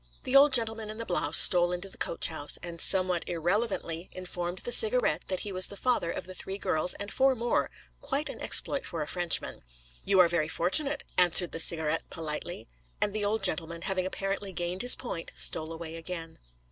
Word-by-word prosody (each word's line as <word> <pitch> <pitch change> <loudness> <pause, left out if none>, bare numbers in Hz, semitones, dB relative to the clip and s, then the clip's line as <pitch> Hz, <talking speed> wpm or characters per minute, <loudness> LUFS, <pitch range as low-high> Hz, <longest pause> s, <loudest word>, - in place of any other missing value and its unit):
The 255 - -2
old 280 +1 +6
gentleman 225 -3 0
in 215 - -7
the 230 - -6
blouse 165 -5 +1
stole 175 -2 +7
into 180 +2 -4
the 190 - -15
coach - - -1
house, 155 -2 -1
and 170 -1 -8
somewhat 185 -2 +1
irrelevantly 175 -1 -2
informed 180 -1 -5
the 240 - -6
Cigarette - - +4
that 185 -1 -3
he 205 - -5
was 185 0 +2
the 200 - -9
father 245 -6 -1
of - - -5
the 185 - -8
three 190 +1 -6
girls 160 -2 +2
and 200 0 -7
four 270 0 +2
more: 240 0 -1 0.3
quite 285 +3 -3
an - - -8
exploit 280 - +1
for 165 -3 -5
a - - -9
Frenchman. 175 -1 +2 0.4
'You 195 -1 +2
are 180 - +6
very 165 -2 -1
fortunate,' 275 - +2 0.2
answered 180 0 +3
the 165 - -6
Cigarette 160 -1 +1
politely. 155 -2 -6 0.3
And 205 - 0
the 215 -1 -2
old 205 +1 -2
gentleman, 170 -2 -1
having 185 -1 -2
apparently 195 +1 -4
gained 175 +1 -3
his 245 - +6
point, 175 -9 -7
stole 160 0 +1
away 165 0 -8
again. 165 -1 -8
185 Hz, 195 wpm, -28 LUFS, 170-210 Hz, 0.4 s, stole